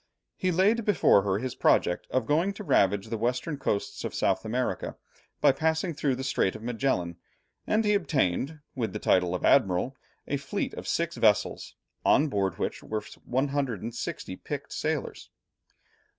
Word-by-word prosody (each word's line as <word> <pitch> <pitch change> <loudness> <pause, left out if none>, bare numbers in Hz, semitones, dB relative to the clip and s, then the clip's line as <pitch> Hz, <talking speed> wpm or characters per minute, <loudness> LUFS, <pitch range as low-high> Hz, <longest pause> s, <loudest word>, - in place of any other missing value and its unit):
He 185 - 0
laid 205 +7 +3
before 200 - +4
her 95 -1 0
his 125 +3 -3
project 90 - +2
of 130 -3 0
going 165 - +2
to 210 - -8
ravage 100 - +2
the 115 - -3
western 125 +6 -1
coasts 100 - -2
of - - -4
South - - +1
America, 125 +3 -2 0.4
by - - +6
passing 160 +4 0
through 140 -3 0
the 130 - -5
Strait 130 -7 +1
of - - -9
Magellan, 115 -8 -1 0.5
and 215 +1 +2
he 210 - +3
obtained, 150 - 0
with 120 -4 -3
the - - -2
title 90 -3 +2
of - - -2
admiral, 120 0 +3 0.3
a 140 - 0
fleet 140 +9 -3
of - - -7
six 170 0 -1
vessels, 105 -2 +1 0.3
on 150 +1 +4
board 100 -5 0
of - - -20
which - - -3
were 110 -1 -4 0.2
160 130 -4 -2
picked - - -6
sailors. - - -3
130 Hz, 165 wpm, -28 LUFS, 105-160 Hz, 0.5 s, by